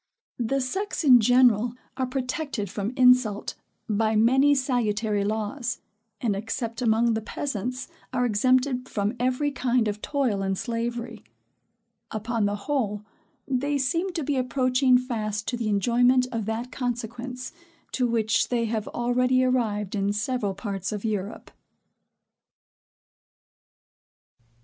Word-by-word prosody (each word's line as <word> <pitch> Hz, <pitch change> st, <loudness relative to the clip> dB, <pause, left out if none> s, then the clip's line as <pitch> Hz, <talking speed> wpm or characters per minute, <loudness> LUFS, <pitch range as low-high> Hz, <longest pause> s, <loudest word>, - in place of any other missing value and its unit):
The 245 Hz, +4 st, 0 dB
sex, 380 Hz, +10 st, -2 dB
in 255 Hz, -5 st, +8 dB
general, 245 Hz, 0 st, +4 dB, 0.2 s
are 260 Hz, -1 st, -1 dB
protected 255 Hz, -, -3 dB
from 205 Hz, +2 st, -3 dB
insult, 250 Hz, -5 st, +4 dB, 0.3 s
by 220 Hz, +1 st, +1 dB
many 265 Hz, +6 st, +5 dB
salutary 220 Hz, -6 st, 0 dB
laws; 220 Hz, +4 st, -2 dB, 0.4 s
and, 215 Hz, -4 st, 0 dB
except 225 Hz, +3 st, -4 dB
among 230 Hz, 0 st, +3 dB
the 220 Hz, -, -1 dB
peasants, 250 Hz, +1 st, -4 dB, 0.2 s
are 250 Hz, -1 st, +1 dB
exempted 255 Hz, +3 st, +1 dB
from 205 Hz, +1 st, -1 dB
every 255 Hz, +4 st, +1 dB
kind 250 Hz, -4 st, +1 dB
of 210 Hz, 0 st, -3 dB
toil 255 Hz, -9 st, 0 dB
and 195 Hz, 0 st, -1 dB
slavery. 235 Hz, 0 st, -4 dB, 0.9 s
Upon 220 Hz, 0 st, -1 dB
the 205 Hz, -, -1 dB
whole, 220 Hz, -8 st, -1 dB, 0.4 s
they 280 Hz, +2 st, 0 dB
seem 335 Hz, +8 st, 0 dB
to 330 Hz, -4 st, -2 dB
be 280 Hz, 0 st, -1 dB
approaching 255 Hz, 0 st, +3 dB
fast 215 Hz, -5 st, -3 dB
to 245 Hz, -, -2 dB
the 230 Hz, -3 st, -2 dB
enjoyment 245 Hz, +5 st, +3 dB
of 225 Hz, -3 st, -3 dB
that 230 Hz, +3 st, -3 dB
consequence, 245 Hz, +1 st, -4 dB, 0.4 s
to 250 Hz, -2 st, +1 dB
which 225 Hz, -1 st, +1 dB
they 235 Hz, -2 st, +1 dB
have 220 Hz, -1 st, -2 dB
already 250 Hz, +1 st, +1 dB
arrived 220 Hz, -6 st, 0 dB
in 200 Hz, -1 st, 0 dB
several 210 Hz, -2 st, -1 dB
parts 195 Hz, -2 st, -4 dB
of 210 Hz, 0 st, -4 dB
Europe. 205 Hz, -3 st, -4 dB
240 Hz, 125 wpm, -26 LUFS, 215-255 Hz, 0.9 s, in